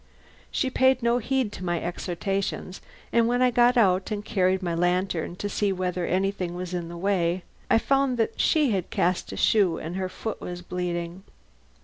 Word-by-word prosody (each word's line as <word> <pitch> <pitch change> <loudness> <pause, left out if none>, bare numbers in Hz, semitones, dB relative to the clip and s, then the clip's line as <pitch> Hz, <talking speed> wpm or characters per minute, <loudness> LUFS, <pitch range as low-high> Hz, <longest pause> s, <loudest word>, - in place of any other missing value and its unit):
She 260 -3 -1
paid 260 -1 +3
no 235 +1 +3
heed 255 -2 0
to 185 - -8
my 175 -1 0
exhortations, 185 +2 -3 0.3
and 235 -1 +4
when 245 +1 +2
I 250 - +4
got 245 +1 +4
out 190 -4 +3
and 210 -1 -4
carried 190 -3 +1
my 175 -1 -1
lantern 175 0 0
to 205 - -4
see 205 0 0
whether 180 -1 -2
anything 185 -1 -1
was 180 0 -5
in 175 -2 -3
the 170 - -7
way, 180 -1 0 0.3
I - - +5
found 270 +1 +1
that 225 - -1
she 300 -6 +3
had 190 -4 -1
cast 180 +1 0
a - - -6
shoe 190 -7 +3
and 170 +4 -5
her 185 -1 -2
foot 220 +3 -5
was 175 0 -6
bleeding. 175 0 -4
190 Hz, 190 wpm, -26 LUFS, 175-225 Hz, 0.3 s, I